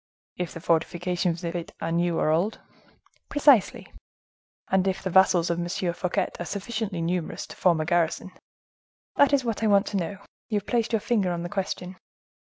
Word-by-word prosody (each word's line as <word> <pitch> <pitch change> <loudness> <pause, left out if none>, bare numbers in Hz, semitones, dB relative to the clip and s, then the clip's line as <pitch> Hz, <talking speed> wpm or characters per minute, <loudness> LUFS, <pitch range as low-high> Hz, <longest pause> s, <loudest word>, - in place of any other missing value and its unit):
"If 180 -2 -4
the - - -5
fortifications 175 +1 0
of 170 -1 -3
it 170 -1 -5
are 165 - -3
new 170 0 +1
or 155 - +2
old?" 175 +7 0 0.7
"Precisely." 285 -7 +3 0.7
"And 190 0 +2
if 190 0 -1
the 190 - -2
vassals 175 -2 +4
of 170 - -1
M. 175 - -2 0.3
Fouquet 180 +2 -1
are 175 - -3
sufficiently 200 -1 -3
numerous 170 -1 -2
to - - -11
form 175 -3 +3
a 155 - -1
garrison?" 175 +2 0 0.9
"That 285 - +5
is 275 -3 +2
what 225 -2 -2
I 220 - +2
want 200 -1 +4
to 200 - -1
know; 190 +2 -3 0.3
you 215 - +1
have 205 - -4
placed 235 -1 0
your 225 -2 +1
finger 200 -6 +1
on 170 -1 -3
the 175 - -4
question." 185 -2 -4
185 Hz, 190 wpm, -26 LUFS, 170-205 Hz, 0.9 s, That